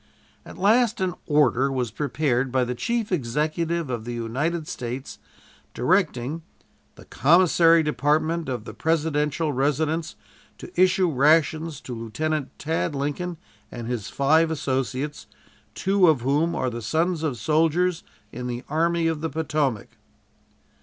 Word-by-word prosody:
At - - -12
last 225 +4 +3
an 185 -1 0
"order" 140 -3 +3
was 125 -4 -2
prepared 135 -1 -1
by 130 0 +2
the 125 0 -2
Chief 230 - -2
Executive 155 +2 -1
of 120 -3 -3
the 120 +1 -5
United 145 +8 -2
States 125 +2 -6 0.6
directing 155 - 0 0.5
"The - - -15
Commissary 165 +1 +4
Department 155 +3 0
of 120 -4 -4
the - - -8
Presidential 155 -1 0
Residence 155 +4 0 0.4
to - - -10
issue 185 -1 +3
rations 155 +2 +2
to 125 - -7
Lieutenant 135 +6 -3
Tad 160 -1 -2
Lincoln 150 +5 -3 0.3
and 120 - -6
his 120 -4 -4
five 155 +4 +3
associates, 135 -1 -3 0.5
two 190 -1 +3
of 155 -6 +3
whom 145 +7 +1
are 130 - -1
the 120 0 -5
sons 160 +8 0
of 150 -6 -2
soldiers 165 - +1 0.3
in 125 +1 -6
the 120 +1 -4
Army 165 +2 +1
of 160 -2 0
the 160 - -2
Potomac." 145 -7 -1
150 Hz, 135 wpm, -24 LUFS, 130-165 Hz, 0.6 s, Commissary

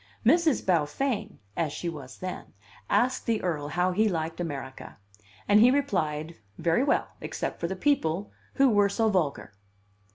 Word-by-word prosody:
Miss 325 +8 +4
Beaufain 200 - 0 0.2
(as 160 -3 -1
she 175 - -5
was 140 -6 -7
then) 185 0 -7 0.4
asked 255 +1 +1
the 225 -2 +2
Earl 155 -5 -1
how 180 +4 +1
he 215 +4 +2
liked 165 -2 -3
America; 140 -6 -6 0.5
and 205 +1 +6
he 235 +3 +7
replied, 165 - -1 0.2
very 170 +9 +2
well, 285 - +1
except - - -4
for 170 - -1
the 190 - -3
people, 195 - 0 0.2
who 275 - +5
were 205 -4 +4
so 220 +2 +1
vulgar. 165 - -1
185 Hz, 155 wpm, -27 LUFS, 160-225 Hz, 0.5 s, he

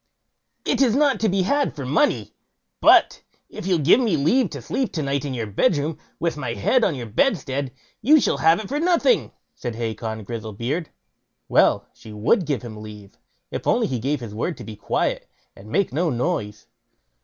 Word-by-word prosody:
"It - - +1
is 250 -4 +4
not 285 -1 +3
to 220 - +2
be 190 0 +1
had 285 +8 0
for 140 - -5
money; 125 -6 +1 0.5
but - - +5 0.3
if - - -7
you'll 185 -2 +3
give 155 - +5
me 220 -10 +1
leave 195 - +2
to 140 - -7
sleep 225 - -2
to 155 - -2
night 140 +1 -1
in 135 -2 -3
your 115 -2 -2
bedroom, 150 - 0 0.2
with 170 -2 -1
my 125 -5 -3
head 240 - +2
on 170 - +2
your 125 -3 -5
bedstead, 135 - 0 0.3
you 300 +7 +6
shall - - +1
have 165 +4 +4
it 215 - -6
for 285 +6 -2
nothing", 355 +8 +2 0.2
said 120 -3 -6
Hacon 110 -1 -4
Grizzlebeard. 115 - -4 0.6
Well! - - +3
she 110 - -13
would 135 - +1
give 140 -6 -1
him 110 -3 -8
leave, 105 -2 -12 0.3
if - - -5
he - - +1
only 125 -3 +1
gave 135 +4 -1
his 115 -3 -7
word 130 +8 -3
to - - -9
be 110 - -8
quiet, - - -2 0.3
and 100 +2 -13
make 195 - 0
no 165 +4 +1
noise. 110 -4 -2
140 Hz, 190 wpm, -23 LUFS, 115-190 Hz, 0.6 s, you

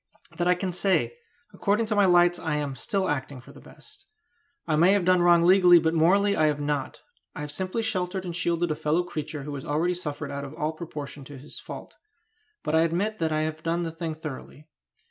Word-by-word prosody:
That 175 - 0
I 180 - +4
can 180 0 -3
say: 190 - +1 0.4
according 210 +3 +1
to 215 -1 -1
my 205 -1 +5
lights 175 0 +4
I 160 -2 -2
am 145 -2 -2
still 190 +8 -1
acting 140 -2 -3
for 125 - -15
the - - -15
best. - - -17 0.6
I 155 - +1
may 175 +5 +5
have 200 -3 +1
done 185 -1 +4
wrong 175 -1 +5
legally, 180 0 +7
but 160 -1 +1
morally 195 +5 +3
I 155 - +3
have 150 -1 0
not. 145 -1 -3 0.3
I - - -6
have 150 0 -5
simply 190 +8 -2
sheltered 185 -3 -2
and 175 -2 -5
shielded 170 0 0
a - - 0
fellow 155 +4 0
creature 155 -4 -5
who 145 +1 -6
has 135 -1 -6
already 160 +5 0
suffered 155 -4 -5
out 140 0 -4
of 140 +2 -8
all 155 +1 -2
proportion 150 -3 -8
to 145 0 -10
his 140 +3 -10
fault; - - -9 0.7
but 150 - -2
I 160 - +5
admit 180 +7 0
that 160 -1 0
I 155 0 +1
have 155 0 -3
done 170 +2 -1
the 165 - -3
thing 160 -1 -5
thoroughly. 155 0 -9
165 Hz, 220 wpm, -26 LUFS, 150-180 Hz, 0.7 s, legally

